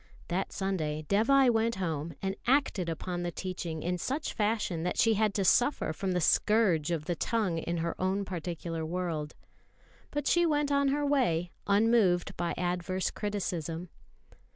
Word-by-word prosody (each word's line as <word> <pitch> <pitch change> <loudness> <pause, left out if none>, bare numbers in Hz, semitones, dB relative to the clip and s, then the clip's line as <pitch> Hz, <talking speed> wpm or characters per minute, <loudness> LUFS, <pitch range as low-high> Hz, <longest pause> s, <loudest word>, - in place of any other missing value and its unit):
That 185 +2 -1
Sunday 155 -6 -2
Dévai 250 +5 +4
went 225 0 +1
home 165 -4 -3
and 195 0 -1
acted 250 -10 +2
upon 175 +2 -3
the 175 - -2
teaching 170 -3 -5
in 180 +1 -1
such 275 - -2
fashion 210 -6 0
that 180 +2 -2
she 225 - +4
had 215 -1 +1
to 195 - +1
suffer 245 - +3
from 185 +3 -2
the 180 - +1
scourge 180 -3 +3
of 165 -3 -2
the 175 - 0
tongue 185 -1 0
in 170 +1 -3
her 170 0 -1
own 190 +2 0
particular 170 -2 -4
world. 160 -3 -3 0.7
But 290 -1 -3
she 345 +3 +4
went 295 -3 +1
on 280 0 +3
her 290 +2 +1
way, 180 - +1 0.2
unmoved 200 -4 +3
by 170 0 -2
adverse 180 +1 -1
criticism. 180 -5 -3
185 Hz, 160 wpm, -30 LUFS, 170-225 Hz, 0.7 s, Dévai